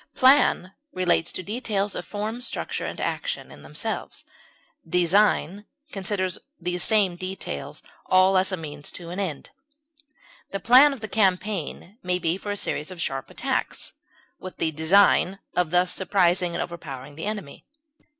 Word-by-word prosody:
Plan 260 -8 +4 0.2
relates 175 -2 +2
to 185 - -5
details 210 -1 -1
of 175 - -5
form, 215 +3 -4
structure, 250 - -2
and - - -6
action, - - -3
in - - -13
themselves; - - -5 0.6
design 195 +2 +2 0.2
considers 190 -2 -2 0.2
these 180 0 -2
same 200 -2 +3
details 185 - -6 0.2
all 185 +1 +5
as 190 +1 +3
a 185 - -1
means 150 -3 -6
to 170 -1 -8
an 180 - -4
end. 170 -8 -4 1.0
The 195 - -3
plan 260 +7 +7
of 265 -5 -7
a - - -2
campaign 200 - -1
may 180 0 0
be 170 -1 0
for 195 +2 -7
a 205 - -2
series 150 -4 -2
of 185 -2 -8
sharp 135 -4 -3
attacks, - - -2 0.5
with 185 - -8
the 160 - 0
design 180 +4 +4 0.2
of 180 -3 +2
thus 180 +1 +2
surprising 180 -2 +2
and - - 0
overpowering 145 -5 -8
the 160 - -5
enemy. 205 -9 -6
185 Hz, 150 wpm, -25 LUFS, 170-205 Hz, 1.0 s, plan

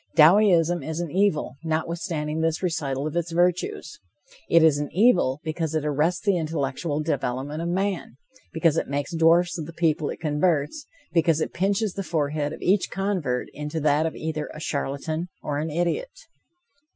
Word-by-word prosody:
Dowieism 175 0 +5
is 160 +3 -4
an 170 -3 -3
evil, 180 -8 +1
notwithstanding 160 -1 -2
this 165 +2 0
recital 145 -6 -1
of 155 - -4
its 170 0 -1
virtues. 175 -3 0 0.5
It 165 -1 +6
is 155 -3 +5
an 145 - -3
evil, 185 - +3
because 160 0 -2
it 155 -1 0
arrests 150 +7 0
the 200 -3 +3
intellectual 155 -1 -2
development 145 0 -2
of 170 - -2
man, 185 -7 -2 0.3
because 165 -1 +2
it - - 0
makes 140 +2 -2
dwarfs 170 +2 +3
of 155 - -5
the 165 - -9
people 155 -3 +1
it - - -6
converts, 155 - 0 0.3
because 165 -2 +3
it - - -2
pinches 195 +2 0
the 200 - -4
forehead 150 -4 -1
of - - -8
each 190 +2 +2
convert 185 -10 -2
into 150 +2 -4
that 150 +1 +2
of 160 - -5
either 155 -1 -4
a - - -7
charlatan 155 +3 -3 0.2
or 145 -1 -2
an 155 +2 -2
idiot. 175 - -2
160 Hz, 170 wpm, -25 LUFS, 150-175 Hz, 0.5 s, It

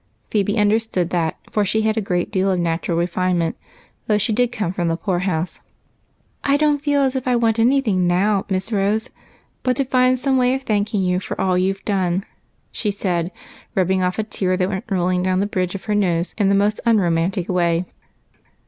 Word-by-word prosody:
Phebe 205 +1 +1
understood 210 -4 +1
that, 165 -3 0
for 210 - +1
she 220 +2 +1
had 220 0 +1
a 220 - 0
good 180 -3 -1
deal 195 -2 +1
of 185 -2 +1
natural 165 0 -1
refinement, 175 -1 0 0.5
though 210 - +3
she 215 +2 +1
did 245 +2 +1
come 210 -7 -2
from 175 -2 -1
the 165 0 0
poor 185 -2 -1
house. 180 -2 -2 0.8
"I 280 0 +3
don't 295 -1 +2
feel 290 -1 +2
as 265 0 0
if 260 -1 -3
I 250 - +3
wanted 230 -1 +3
any 275 +2 +3
thing 185 -8 +1
now. 195 +3 +2
Miss 190 +3 -2
Rose, 210 +1 0 0.5
but 250 -1 0
to 275 - +1
find 255 0 +3
some 265 +1 +1
way 250 0 +3
of 265 - -5
thanking 210 -3 0
you 180 0 +1
for - - -6
all 185 -1 +2
you've 190 +2 0
done," 190 -2 0 0.5
she 210 - -2
said, 180 -3 -1 0.4
rubbing 190 0 +2
off 180 0 0
a 220 - 0
tear 185 -3 -1
that 185 0 0
went 195 +2 -4
rolling 180 -2 +1
down 185 0 +1
the 200 - +1
bridge 185 -2 -2
of 195 - -6
her 210 - -1
nose 180 -4 +1
in 205 -3 +2
the 200 - +3
most 205 +2 +1
un 230 -1 +4
romantic 175 +1 0
way. 175 -1 +1
195 Hz, 210 wpm, -20 LUFS, 180-220 Hz, 0.8 s, un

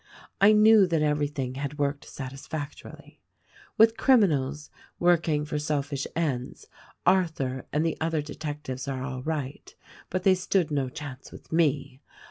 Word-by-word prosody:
I 200 +2 +8
knew 215 -2 +6
that 165 -3 +1
everything 145 -3 -1
had 145 +1 -4
worked 140 -1 -1
satisfactorily. 140 +2 -8 0.6
With 225 +1 +5
criminals, 150 - +2 0.3
working 165 -4 +2
for 150 0 -3
selfish 145 -2 -2
ends, 140 -7 -2 0.4
Arthur 160 -8 +1
and 150 +2 +1
the 165 - -1
other 160 -2 0
detectives 145 -4 -6
are 130 -2 -3
all 130 -1 -5
right; 145 -2 -5 0.3
but 185 0 -2
they 190 -1 +6
stood 185 -2 0
no 140 -3 0
chance 135 -1 -9
with - - -14
me. 145 -4 0
150 Hz, 135 wpm, -27 LUFS, 140-165 Hz, 0.6 s, I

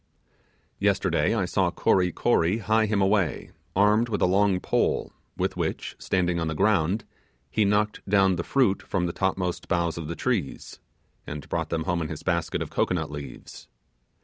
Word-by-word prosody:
Yesterday - - +1
I - - +1
saw - - +1
Kory 90 -2 +2
Kory 85 +4 +2
hie 110 0 +2
him 100 -2 +1
away, 95 -6 0 0.2
armed 105 +4 +3
with 105 - -1
a - - +6
long 95 0 +3
pole, - - 0 0.3
with - - -1
which, - - -3
standing 90 -2 0
on 80 - -1
the 80 - -2
ground, 100 +2 +2 0.5
he 110 - +2
knocked 105 +1 +1
down 95 -2 +4
the 85 - -3
fruit 125 -6 +2
from 90 -3 -1
the 85 - -2
topmost 95 -2 -2
boughs 85 -2 0
of 80 - -5
the 85 - -4
trees, 105 - -3 0.5
and 75 -1 -6
brought - - -2
them 80 -1 -1
home 90 -1 -1
in 80 - -2
his 80 - -7
basket 85 -3 -1
of - - -10
cocoanut 80 -4 0
leaves. 75 -1 -9
95 Hz, 175 wpm, -26 LUFS, 85-105 Hz, 0.5 s, a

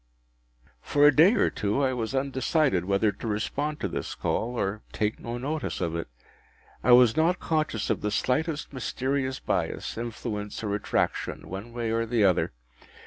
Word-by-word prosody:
For 145 0 +3
a 150 -2 +7
day 180 +10 +7
or - - +2
two 105 +7 0
I 130 -1 +2
was 120 +1 -3
undecided 135 - +1
whether 100 +2 +2
to 115 - -7
respond 145 +8 -2
to - - 0
this - - -4
call, 120 +2 -1
or 100 +2 -1
take 105 0 -1
no 120 +1 -5
notice 145 +3 -3
of 85 -2 -1
it. 85 - -3 0.8
I 125 - +4
was 120 -2 +7
not 170 +3 +2
conscious 155 -9 -1
of - - -1
the 105 - 0
slightest 150 +8 -1
mysterious 130 +1 -2
bias, - - -2
influence, 110 -3 -5
or 105 -2 -1
attraction, 105 - -1
one 100 +6 -6
way 115 -1 -2
or 115 0 +1
other. 110 -5 +2
120 Hz, 165 wpm, -27 LUFS, 105-140 Hz, 0.8 s, a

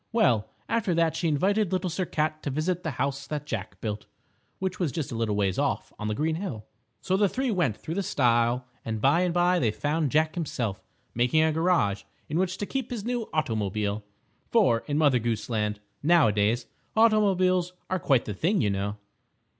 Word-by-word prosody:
Well, 125 - +2 0.2
after 210 -7 0
that 165 -1 +2
she 170 - 0
invited 190 +6 +1
Little 185 0 0
Sir 185 +2 -1
Cat 155 0 -1
to - - -3
visit 160 +6 -1
the 160 - -2
House 140 0 -2
that 150 -1 -4
Jack 110 -8 -5
Built, 105 -1 -4 0.5
which 185 -1 -3
was 170 -6 0
just 155 -4 -4
a - - -4
little 115 -2 0
ways 100 -2 0
off - - -1
on 105 - -3
the 105 - -1
green 160 +4 0
hill. 135 - -5 0.4
So 185 - 0
the 200 0 +3
three 260 +2 -1
went 170 - +1
through 160 - -6
the 200 - 0
stile 120 -6 +2 0.2
and 110 -1 -3
by 140 +9 +4
and 180 -1 +1
by 175 +1 +3
they 115 - +2
found 145 +8 0
Jack 155 +3 +2
himself 120 - -3 0.3
making 125 +7 +3
a 160 - +3
garage 160 - +2 0.3
in 155 +3 -1
which 185 0 0
to 205 - -3
keep 265 +2 -3
his 230 -5 -5
new 240 -2 -2
automobile, 105 -7 -1 0.5
for 195 - +4
in 145 -1 0
Mother 145 -5 +4
Goose 115 0 -2
Land, 105 -1 -1 0.2
now 165 -4 +5
a - - +2
days, 105 +4 +1 0.3
automobiles 190 -5 +3
are 185 - -1
quite 135 -7 +2
the 105 - -3
thing, 180 - +1
you 105 -5 +2
know. 100 +1 -2
155 Hz, 200 wpm, -27 LUFS, 115-185 Hz, 0.5 s, now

